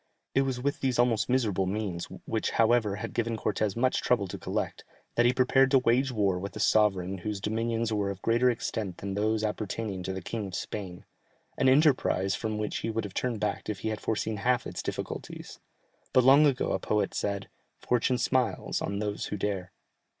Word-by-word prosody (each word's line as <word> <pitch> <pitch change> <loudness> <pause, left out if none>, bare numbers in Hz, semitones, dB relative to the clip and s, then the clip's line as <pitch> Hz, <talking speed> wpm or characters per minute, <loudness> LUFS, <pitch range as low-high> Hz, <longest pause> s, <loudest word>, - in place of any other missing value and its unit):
It 135 - +4
was 130 -2 -1
with 140 +3 -1
these 130 -2 0
almost 120 -2 +2
miserable 105 -7 +1
means, 95 -3 -2 0.2
which, - - -1
however, 115 -3 +3
had - - -6
given 115 -1 -1
Cortès 105 -1 -1
much 130 +2 +2
trouble 110 -6 +1
to - - -5
collect, - - -3 0.3
that 120 0 +4
he - - +5
prepared 130 +1 +4
to 135 - +5
wage 130 +2 +2
war 100 -5 +1
with 95 0 -6
a - - -5
sovereign 95 -3 +2
whose 105 +2 -3
dominions 115 +2 -1
were 100 -2 0
of 100 -1 -5
greater 120 +2 +3
extent 110 -5 -3
than 100 0 -4
those 110 +2 0
appertaining 105 -2 -3
to 95 +1 -3
the 95 -1 -5
King 110 0 -4
of 95 - -6
Spain 90 -3 -5 0.5
an 130 - +3
enterprise 130 - +3
from 110 +1 -2
which 105 0 -2
he - - -3
would 115 0 -1
have 100 -3 -7
turned 120 -1 -1
back 105 +1 -2
if 100 -3 -4
he 110 - -1
had 110 -1 -4
foreseen 110 0 -1
half 125 +4 +1
its - - -5
difficulties. - - -6 0.5
But 130 - +6
long 140 +4 +7
ago 135 -3 0
a - - 0
poet 105 -2 0
said, 100 -1 -2 0.3
"Fortune 125 +1 +1
smiles 125 -1 0
on 100 - -2
those 105 0 -2
who 105 - -4
dare." 95 -2 -2
110 Hz, 200 wpm, -29 LUFS, 100-125 Hz, 0.5 s, long